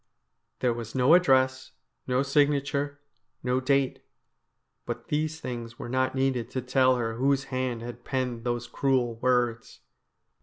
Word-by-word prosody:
There 125 -2 +2
was 115 0 -7
no 130 +4 +5
address, 130 -7 +3 0.3
no 130 +1 +2
signature, 145 0 +1 0.4
no 125 +1 +1
date. 135 0 +1 0.8
But - - -5
these 155 +1 -1
things 120 -3 -6
were 120 - -7
not 130 +1 0
needed 130 -3 0
to 130 - -3
tell 130 0 +3
her 115 -2 -2
whose 135 +2 +2
hand 125 -3 -2
had 120 0 -8
penned 125 -3 -2
those 120 -1 -2
cruel 130 -2 +1
words. 120 -2 0
130 Hz, 140 wpm, -27 LUFS, 120-135 Hz, 0.8 s, no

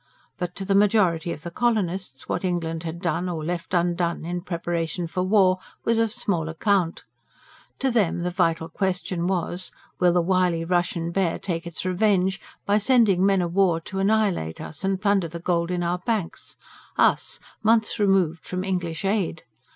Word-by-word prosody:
But 180 -1 -3
to 195 - -5
the 195 - +1
majority 195 -5 +3
of 155 - -7
the 170 - -6
colonists 190 - -1
what - - -2
England 165 -3 -1
had 170 +2 -6
done, 180 +1 0
or 160 -3 -4
left 175 +2 -3
undone, 170 -1 0
in 175 +1 -3
preparation 170 -1 -2
for 175 +2 -3
war, 185 -1 +4 0.3
was 230 0 +2
of 225 -1 +2
small 200 -9 -1
account. 175 +1 0 0.7
To 265 -1 0
them 200 -7 +1
the 180 - -1
vital 165 -3 +1
question 180 0 -2
was: 185 0 -2 0.3
will 180 -1 +5
the 175 - +3
wily 180 -2 +1
Russian 175 -1 0
Bear 180 -2 0
take 170 -2 -3
its 170 +1 -5
revenge 190 0 +2 0.2
by 205 +1 +3
sending 210 -5 +4
men 195 -2 +3
of 170 -1 -3
war 185 -4 +3
to 190 +4 -5
annihilate 195 - +1
us 155 +4 -7
and 190 -1 0
plunder 200 -3 +2
the 165 +1 -7
gold 170 0 0
in 180 -1 -1
our 175 +1 0
banks 205 -3 -3 0.4
us, - - +2 0.2
months 220 0 +2
removed 190 -5 +2
from 185 0 -4
English 180 -3 -2
aid? 195 -5 0
180 Hz, 175 wpm, -24 LUFS, 170-195 Hz, 0.7 s, will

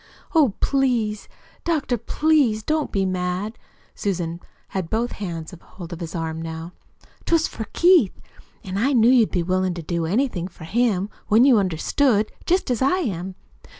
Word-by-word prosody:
"Oh, 285 - +4
please, 240 -6 0 0.3
doctor, 310 -7 0
please, 265 -3 +2
don't 310 +2 -1
be 195 -1 +1
mad!" 185 +4 -2 0.3
Susan 175 -4 -3 0.3
had 185 -4 -3
both 235 +2 -1
hands 170 -4 -6
hold 175 -2 -10
of 170 - -7
his 170 0 -6
arm 160 -1 -3
now. 165 +1 -6 0.5
"'Twas 330 -1 +2
for 220 - -6
Keith, 345 - +4 0.4
an' 190 +1 -3
I 270 +6 +2
knew 235 -1 +5
you'd 240 -4 +5
be 175 -3 -1
willin' 185 0 0
to 170 - -6
do 170 +1 -2
anything 200 -3 0
for 175 -3 -14
him, 205 +1 0 0.2
when 225 +4 +5
you 255 -6 +6
understood, 210 - +1 0.2
jest 360 -6 +2
as 240 - -1
I 275 +8 +3
am. 190 - -3
205 Hz, 160 wpm, -23 LUFS, 180-255 Hz, 0.5 s, you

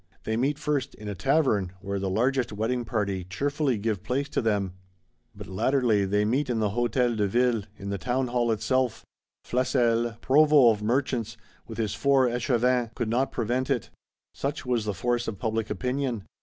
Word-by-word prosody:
They 110 - -1
meet 135 +5 0
first 145 -4 -2
"in 105 - -10
a 105 - -3
Tavern;"—where 100 - 0
"the 95 0 -2
largest 125 +5 +1
wedding 115 +4 -1
party" 100 -5 -1
cheerfully 135 - -1
give 105 -2 -2
place 135 +6 -1
to - - 0
them. 100 -5 0 0.6
But 105 0 -8
latterly 110 +1 +1
they 105 +2 +1
meet 130 +6 0
in 120 - 0
the 110 -2 +1
Hôtel 120 +1 +1
de 105 -2 +1
Ville, 120 0 +1
in 100 0 -6
the 100 - -3
Townhall 125 0 0
itself. 130 +2 0 0.4
Flesselles, 120 -2 +1
Provost 140 -6 +5
of - - -8
Merchants, 120 -1 -1 0.3
with 115 - -8
his 110 -3 -1
Four 135 +3 +3
Echevins 120 0 0
(Scabins, 120 -1 +1 0.2
Assessors), 115 - -17
could 115 -2 -2
not 130 +4 +1
prevent 125 +3 -1
it; 125 -5 -1 0.4
such 140 +1 -4
was 120 -3 0
the 105 -2 -2
force 120 +5 -1
of 110 -3 -4
public 110 +1 -2
opinion. 125 +1 -2
120 Hz, 180 wpm, -26 LUFS, 105-130 Hz, 0.6 s, Provost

